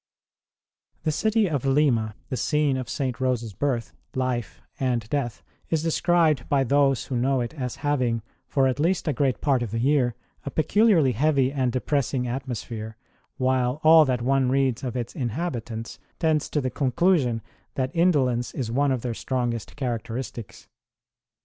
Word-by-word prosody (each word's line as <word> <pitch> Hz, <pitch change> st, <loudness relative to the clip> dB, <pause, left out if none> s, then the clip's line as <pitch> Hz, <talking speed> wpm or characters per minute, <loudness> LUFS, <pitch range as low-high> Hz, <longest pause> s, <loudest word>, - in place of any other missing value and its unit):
The 155 Hz, -, +1 dB
city 215 Hz, +6 st, +2 dB
of 145 Hz, -7 st, -1 dB
Lima, 135 Hz, -6 st, +2 dB
the 130 Hz, -, -2 dB
scene 150 Hz, 0 st, +1 dB
of 130 Hz, -1 st, -4 dB
St. 130 Hz, -3 st, -2 dB
Rose 125 Hz, -2 st, +1 dB
s 110 Hz, -3 st, -7 dB
birth, 120 Hz, +2 st, -2 dB, 0.2 s
life, 125 Hz, -6 st, -2 dB, 0.2 s
and 125 Hz, -5 st, 0 dB
death, 135 Hz, -5 st, -2 dB, 0.3 s
is 160 Hz, -1 st, 0 dB
described 165 Hz, -4 st, +2 dB
by 140 Hz, -2 st, +3 dB
those 135 Hz, 0 st, +2 dB
who 130 Hz, -, -4 dB
know 130 Hz, +2 st, +1 dB
it 120 Hz, +2 st, -3 dB
as 125 Hz, -6 st, -4 dB
having, 125 Hz, -6 st, +1 dB, 0.2 s
for 135 Hz, -2 st, +2 dB
at 130 Hz, +1 st, 0 dB
least 170 Hz, +3 st, +1 dB
a 150 Hz, -, +2 dB
great 135 Hz, -1 st, 0 dB
part 135 Hz, -4 st, +2 dB
of 120 Hz, -, -2 dB
the 115 Hz, -, -3 dB
year, 125 Hz, -2 st, +2 dB, 0.3 s
a -, -, -4 dB
peculiarly 165 Hz, -, +3 dB
heavy 135 Hz, +1 st, +2 dB
and 130 Hz, -3 st, 0 dB
depressing 130 Hz, 0 st, 0 dB
atmosphere, 120 Hz, -3 st, -5 dB, 0.4 s
while 130 Hz, 0 st, +1 dB
all 160 Hz, 0 st, +8 dB
that 125 Hz, -3 st, -1 dB
one 135 Hz, 0 st, +2 dB
reads 135 Hz, -1 st, +1 dB
of 125 Hz, -1 st, -3 dB
its 120 Hz, -1 st, -4 dB
inhabitants 120 Hz, -4 st, -4 dB, 0.2 s
tends 155 Hz, -3 st, +1 dB
to 150 Hz, -, 0 dB
the 130 Hz, -1 st, -2 dB
conclusion 135 Hz, -4 st, +1 dB, 0.3 s
that 130 Hz, +5 st, -2 dB
indolence 135 Hz, -9 st, +2 dB
is 120 Hz, -4 st, -3 dB
one 140 Hz, +3 st, +2 dB
of 130 Hz, -3 st, -1 dB
their 120 Hz, -2 st, -2 dB
strongest 120 Hz, -2 st, -3 dB
characteristics. 120 Hz, -3 st, -5 dB
130 Hz, 160 wpm, -25 LUFS, 120-145 Hz, 0.4 s, all